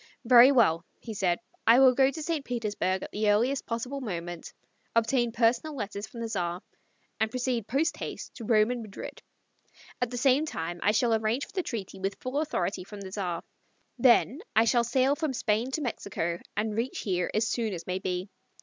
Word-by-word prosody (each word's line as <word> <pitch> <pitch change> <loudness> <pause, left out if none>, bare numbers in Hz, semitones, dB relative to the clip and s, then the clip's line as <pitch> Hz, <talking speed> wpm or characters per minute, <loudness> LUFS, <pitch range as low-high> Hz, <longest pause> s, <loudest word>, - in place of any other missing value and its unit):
"Very 245 +2 +8
well," 170 -11 +4 0.2
he 225 - -7
said. 180 -4 +1 0.3
"I 235 +3 +8
will 260 -1 +7
go 265 +1 +4
to 310 +3 -6
St. 320 -3 -1
Petersburg 210 -6 -2
at - - -7
the 210 0 +1
earliest 240 +7 +2
possible 245 +4 -3
moment, 175 -6 -5 0.4
obtain 235 +1 +2
personal 235 +6 +1
letters 205 -3 -5
from 235 - -9
the 230 - -2
Tsar 180 -4 -3 0.6
and 220 - +2
proceed 245 -2 -2
post 285 +8 0
haste - - -6
to 235 - -9
Rome 215 +1 +3
and 245 -1 -3
Madrid. 215 -3 -8 0.8
At 245 - +1
the 245 - -5
same 270 +4 +3
time 175 - -4
I 205 - +3
shall 230 +2 +2
arrange 220 +5 0
for - - -18
the 380 - 0
treaty 200 - -6
with 195 +1 -2
full 255 +3 -2
authority 195 - -2
from 205 +2 -10
the 190 -1 -8
Tsar. 180 -4 -3 0.6
Then 255 +3 +4 0.2
I 225 - +5
shall 235 +1 +3
sail 260 +4 +2
from 310 -3 -2
Spain 225 +1 0
to 310 - -1
Mexico 180 - -3 0.2
and 215 0 -1
reach 235 +4 -2
here 180 -3 -1
as 220 +1 +2
soon 225 -1 -1
as 175 -3 -6
may 185 +1 -2
be. 180 0 -3
230 Hz, 195 wpm, -28 LUFS, 200-255 Hz, 0.8 s, Very